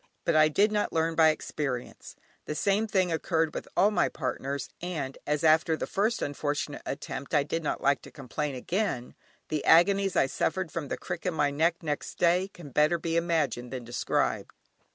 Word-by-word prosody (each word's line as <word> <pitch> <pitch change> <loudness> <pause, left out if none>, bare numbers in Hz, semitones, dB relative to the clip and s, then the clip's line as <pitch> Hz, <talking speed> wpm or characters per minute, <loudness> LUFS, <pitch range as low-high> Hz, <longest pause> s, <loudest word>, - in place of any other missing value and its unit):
But 170 - +2
I 155 0 +7
did 200 +8 +3
not 210 -1 0
learn 165 0 +1
by 160 -1 +6
experience: 140 -5 -4 0.3
the 150 - -4
same 200 +8 +1
thing 185 -4 +1
occurred 160 -1 0
with - - -5
all 200 +3 +5
my 210 - +2
partners, 135 +1 -3
and 155 -7 -4
as, 150 +1 0
after 160 0 +4
the - - -2
first 215 +4 0
unfortunate 145 0 -3
attempt 140 +1 -4
I 145 - +4
did 165 +3 -2
not - - -2
like 140 0 +3
to - - -13
complain 140 +1 -4
again, 170 - -2 0.4
the 155 -2 -1
agonies 195 +3 +5
I - - +4
suffered 165 +5 -1
from 160 -2 -4
the - - -3
crick 180 0 -5
in 180 - -1
my 145 -2 +2
neck 165 +4 +1
next 150 -2 -3
day 180 +2 +3
can 175 -7 -12
better 150 +5 +3
be 165 0 -3
imagined 155 -8 0
than 130 -2 -5
described. 120 +1 -1
160 Hz, 190 wpm, -28 LUFS, 145-175 Hz, 0.4 s, I